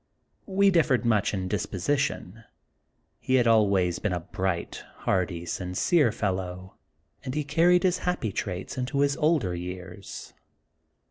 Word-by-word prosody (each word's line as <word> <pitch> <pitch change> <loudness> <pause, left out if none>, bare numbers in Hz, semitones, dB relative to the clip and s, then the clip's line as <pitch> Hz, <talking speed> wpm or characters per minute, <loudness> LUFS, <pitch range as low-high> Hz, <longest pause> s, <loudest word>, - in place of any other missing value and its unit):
We 200 0 +3
differed 150 -8 +2
much 105 -4 +2
in 95 -2 -3
disposition. 105 +2 -2 0.8
He 130 - 0
had 125 -2 +4
always 100 -6 +3
been 105 - -1
a 90 - -2
bright, 95 0 -3 0.2
hearty, 85 -2 0
sincere 95 - +1
fellow, 95 -3 -3 0.5
and 130 0 -5
he 150 - 0
car 150 +4 +2
ried 180 +1 +5
his 185 -1 +2
happy 180 - -1
traits 95 +6 -4
into 135 +3 -1
his 140 0 +2
older 150 - +2
years. 90 +2 -8
105 Hz, 135 wpm, -27 LUFS, 90-145 Hz, 0.8 s, ried